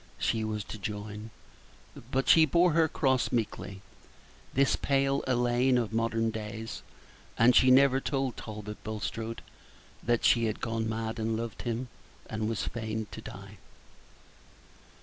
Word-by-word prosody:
she 110 Hz, -1 st, 0 dB
was 105 Hz, -1 st, -2 dB
to 110 Hz, -, -8 dB
join; 105 Hz, +2 st, -5 dB, 0.8 s
but 135 Hz, +1 st, 0 dB
she 160 Hz, -, +8 dB
bore 170 Hz, +4 st, +4 dB
her 160 Hz, +1 st, +4 dB
cross 130 Hz, -4 st, +1 dB
meekly, 100 Hz, -4 st, -3 dB, 0.7 s
this 135 Hz, +1 st, +4 dB
pale 135 Hz, 0 st, +1 dB
Elaine 125 Hz, 0 st, +3 dB
of 115 Hz, -3 st, -1 dB
modern 115 Hz, 0 st, +1 dB
days, 110 Hz, 0 st, -6 dB, 0.6 s
and 120 Hz, +2 st, +5 dB
she 130 Hz, -, +6 dB
never 135 Hz, +1 st, +6 dB
told 135 Hz, -3 st, -1 dB
Talbot 105 Hz, -1 st, -8 dB
Bulstrode 110 Hz, +1 st, -4 dB, 0.6 s
that 120 Hz, 0 st, +1 dB
she 115 Hz, -1 st, +5 dB
had 110 Hz, -1 st, -2 dB
gone 115 Hz, -1 st, -2 dB
mad 110 Hz, +1 st, -3 dB
and 110 Hz, 0 st, 0 dB
loved 115 Hz, -1 st, -5 dB
him, 120 Hz, +1 st, -3 dB, 0.4 s
and 110 Hz, 0 st, -2 dB
was 115 Hz, -, -2 dB
fain 110 Hz, -1 st, -3 dB
to -, -, -8 dB
die. -, -, -10 dB
115 Hz, 140 wpm, -29 LUFS, 110-130 Hz, 0.8 s, she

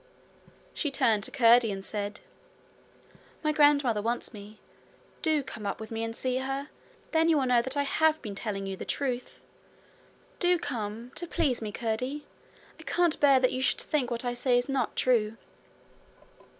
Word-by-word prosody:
She 300 Hz, -, -1 dB
turned 225 Hz, -6 st, +2 dB
to -, -, -3 dB
Curdie 235 Hz, -3 st, +5 dB
and 195 Hz, 0 st, -5 dB
said: 205 Hz, -1 st, -4 dB, 1.2 s
'My 305 Hz, -, +2 dB
grandmother 285 Hz, -7 st, +4 dB
wants 235 Hz, +3 st, -2 dB
me. 210 Hz, 0 st, -11 dB, 0.6 s
Do 310 Hz, -3 st, +2 dB
come 215 Hz, -5 st, -6 dB
up -, -, -3 dB
with 220 Hz, 0 st, -8 dB
me 225 Hz, 0 st, -3 dB
and 225 Hz, 0 st, -4 dB
see 255 Hz, +1 st, -1 dB
her. 270 Hz, +2 st, -3 dB, 0.4 s
Then 325 Hz, 0 st, +3 dB
you 320 Hz, -, +4 dB
will 270 Hz, -, +1 dB
know 245 Hz, -2 st, +4 dB
that 260 Hz, +4 st, -4 dB
I 285 Hz, -, +2 dB
have 315 Hz, +2 st, +2 dB
been 210 Hz, -4 st, -6 dB
telling 195 Hz, -1 st, -4 dB
you 195 Hz, 0 st, -4 dB
the -, -, -7 dB
truth. 255 Hz, -3 st, -3 dB, 1.0 s
Do 355 Hz, -1 st, +3 dB
come 230 Hz, -4 st, -5 dB
to 345 Hz, -, -4 dB
please 295 Hz, -9 st, 0 dB
me, 215 Hz, -1 st, -4 dB
Curdie. 250 Hz, +7 st, -3 dB, 0.5 s
I -, -, -10 dB
can't 345 Hz, 0 st, +1 dB
bear 270 Hz, -3 st, +5 dB
you 255 Hz, -, -3 dB
should -, -, +1 dB
think 275 Hz, -6 st, -1 dB
what 235 Hz, 0 st, -3 dB
I 245 Hz, -, 0 dB
say 245 Hz, 0 st, +2 dB
is 245 Hz, -, +1 dB
not 275 Hz, -1 st, -1 dB
true.' 225 Hz, -3 st, +2 dB
250 Hz, 175 wpm, -28 LUFS, 220-285 Hz, 1.2 s, Curdie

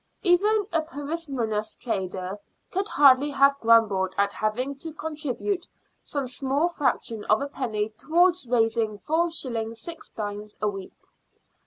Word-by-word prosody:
Even 410 Hz, +3 st, +3 dB
a 325 Hz, -, +3 dB
parsimonious 280 Hz, -9 st, -3 dB
trader 190 Hz, -3 st, -3 dB, 0.3 s
could 385 Hz, +2 st, -1 dB
hardly 280 Hz, -2 st, +5 dB
have 275 Hz, 0 st, +4 dB
grumbled 210 Hz, -5 st, +3 dB
at 200 Hz, 0 st, +2 dB
having 245 Hz, +6 st, -1 dB
to 320 Hz, +3 st, -6 dB
contribute 315 Hz, -, -3 dB, 0.3 s
some 285 Hz, -2 st, -3 dB
small 275 Hz, +5 st, 0 dB
fraction 245 Hz, -8 st, -1 dB
of 215 Hz, -, +4 dB
a 280 Hz, -, -2 dB
penny 220 Hz, -7 st, -2 dB
towards 340 Hz, +7 st, +2 dB
raising 225 Hz, -2 st, +1 dB
4s. 255 Hz, -7 st, -1 dB
6d. 210 Hz, -8 st, -6 dB
a 215 Hz, -, 0 dB
week. 195 Hz, -2 st, -5 dB
255 Hz, 125 wpm, -26 LUFS, 215-315 Hz, 0.3 s, hardly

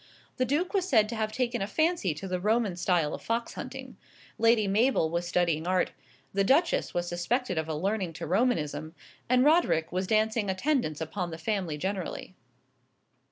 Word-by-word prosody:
The 255 Hz, -, +2 dB
Duke 305 Hz, -, 0 dB
was 375 Hz, -2 st, 0 dB
said 220 Hz, -6 st, +5 dB
to 235 Hz, -, -4 dB
have 220 Hz, -1 st, -1 dB
taken 240 Hz, -2 st, -1 dB
a 195 Hz, -, -1 dB
fancy 315 Hz, -, +1 dB
to 190 Hz, +6 st, -6 dB
the 180 Hz, -1 st, -2 dB
Roman 215 Hz, -1 st, +1 dB
style 175 Hz, -4 st, +1 dB
of -, -, -6 dB
fox 230 Hz, +1 st, -2 dB
hunting; -, -, -8 dB, 0.4 s
Lady 230 Hz, -2 st, +4 dB
Mabel 205 Hz, -5 st, +2 dB
was 170 Hz, +1 st, -1 dB
studying 170 Hz, -2 st, +1 dB
art; 185 Hz, 0 st, +1 dB, 0.4 s
the 195 Hz, 0 st, +2 dB
Duchess 280 Hz, -, +2 dB
was 175 Hz, 0 st, -1 dB
suspected 180 Hz, +3 st, -1 dB
of 160 Hz, -, -3 dB
a 155 Hz, -, -1 dB
leaning 190 Hz, +2 st, -1 dB
to -, -, -6 dB
Romanism; 160 Hz, -, 0 dB, 0.3 s
and 255 Hz, 0 st, +4 dB
Roderick 300 Hz, -, +3 dB
was 185 Hz, +1 st, -1 dB
dancing 220 Hz, 0 st, +1 dB
attendance 190 Hz, -, 0 dB
upon 175 Hz, +3 st, -3 dB
the 160 Hz, -, -6 dB
family 170 Hz, -3 st, -2 dB
generally. 185 Hz, +1 st, -4 dB
195 Hz, 175 wpm, -28 LUFS, 175-240 Hz, 0.4 s, said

